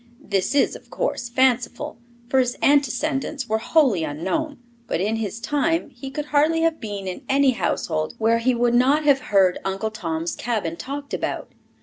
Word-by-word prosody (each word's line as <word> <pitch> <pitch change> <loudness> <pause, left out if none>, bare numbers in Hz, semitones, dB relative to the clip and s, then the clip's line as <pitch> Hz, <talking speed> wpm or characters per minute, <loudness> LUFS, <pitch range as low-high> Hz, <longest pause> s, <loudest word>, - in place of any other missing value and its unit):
This 195 +6 -1
is, 285 - +3
of - - -13
course, - - -2
fanciful, 255 +3 +1 0.3
for 265 +2 +2
his 250 -1 0
antecedents 280 -1 +1
were 220 +1 0
wholly 245 - +3
unknown, 190 - -2 0.3
but - - -1
in 215 +4 0
his 220 0 -4
time 295 +4 0
he 265 +1 -8
could 295 +2 -4
hardly 310 +3 +3
have 330 -2 +1
been 205 -3 -5
in 185 - -5
any 275 0 +4
household 155 -9 -2
where 230 +1 +2
he 250 +2 +2
would 240 0 +2
not 270 +5 +4
have 285 -2 +4
heard 190 -3 +4
Uncle 195 +3 -2
Tom's 165 -5 -3
Cabin 210 -9 -2
talked 280 +8 -6
about. - - -3
245 Hz, 170 wpm, -23 LUFS, 205-285 Hz, 0.3 s, any